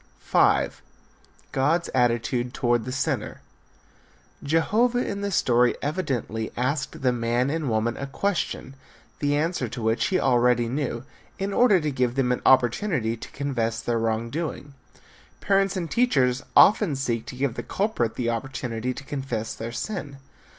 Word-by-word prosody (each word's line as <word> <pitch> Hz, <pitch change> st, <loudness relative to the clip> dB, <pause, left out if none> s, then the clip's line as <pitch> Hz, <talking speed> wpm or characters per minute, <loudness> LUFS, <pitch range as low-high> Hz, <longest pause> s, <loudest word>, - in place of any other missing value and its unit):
V. -, -, +3 dB, 0.8 s
GOD'S 160 Hz, +6 st, +1 dB
ATTITUDE 120 Hz, 0 st, +1 dB
TOWARD 120 Hz, -2 st, +1 dB
THE 130 Hz, -, -4 dB
SINNER. 130 Hz, +1 st, -2 dB, 1.0 s
Jehovah 220 Hz, -, +2 dB
in 200 Hz, 0 st, -3 dB
the 200 Hz, -, -1 dB
story 125 Hz, -9 st, +3 dB
evidently 130 Hz, -, -2 dB
asked 135 Hz, +2 st, -2 dB
the 125 Hz, -, +4 dB
man 120 Hz, +2 st, 0 dB
and 155 Hz, -3 st, -2 dB
woman 110 Hz, +1 st, 0 dB
a 140 Hz, -, -4 dB
question, 170 Hz, -4 st, -2 dB, 0.5 s
the 145 Hz, 0 st, +1 dB
answer 150 Hz, -5 st, -1 dB
to 115 Hz, -, -6 dB
which 110 Hz, 0 st, +1 dB
he 185 Hz, -, +1 dB
already 120 Hz, -2 st, +3 dB
knew, 125 Hz, -2 st, -3 dB, 0.3 s
in 195 Hz, +1 st, -2 dB
order 225 Hz, -6 st, +5 dB
to 150 Hz, -2 st, -2 dB
give 125 Hz, -2 st, 0 dB
them 130 Hz, -2 st, +1 dB
an 125 Hz, -, -1 dB
opportunity 125 Hz, -, +3 dB
to 115 Hz, -, -10 dB
confess 120 Hz, -5 st, -2 dB
their 120 Hz, -1 st, -1 dB
wrong 115 Hz, +1 st, -1 dB
doing. 150 Hz, -2 st, -4 dB, 0.7 s
Parents 195 Hz, -1 st, +1 dB
and 170 Hz, -3 st, -4 dB
teachers 135 Hz, -, +2 dB
often 195 Hz, -6 st, +6 dB
seek 120 Hz, -4 st, -2 dB
to -, -, -7 dB
give 135 Hz, -1 st, -1 dB
the -, -, -4 dB
culprit 195 Hz, -, -1 dB
the 120 Hz, -2 st, -1 dB
opportunity 125 Hz, 0 st, -3 dB
to -, -, -8 dB
confess 135 Hz, -6 st, -4 dB
his 115 Hz, +1 st, -6 dB
sin. 170 Hz, -10 st, -5 dB
130 Hz, 150 wpm, -25 LUFS, 120-160 Hz, 1.0 s, often